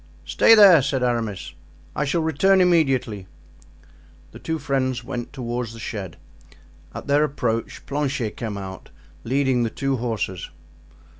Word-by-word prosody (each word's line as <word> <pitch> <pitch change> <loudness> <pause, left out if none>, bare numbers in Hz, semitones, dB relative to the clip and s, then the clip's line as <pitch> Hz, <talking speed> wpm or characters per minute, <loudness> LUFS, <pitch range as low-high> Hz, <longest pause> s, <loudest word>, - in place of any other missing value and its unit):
"Stay 225 - +5
there," 195 -8 +8
said 135 -1 -1
Aramis; 110 -9 -2 0.4
"I 150 - 0
shall 160 +4 0
return 190 +5 +3
immediately." 135 - +1 1.0
The - - -12
two 160 0 -3
friends 130 -4 -1
went 120 0 -6
toward 125 -2 -4
the 115 +1 -10
shed. 100 -7 -6 0.7
At - - -8
their 145 +1 +3
approach 125 -6 -3
Planchet 140 -5 -2
came 110 -3 -5
out 95 -1 -8 0.3
leading 130 0 +1
the 115 - 0
two 135 +3 -2
horses. 110 -6 -3
130 Hz, 135 wpm, -23 LUFS, 115-145 Hz, 1.0 s, there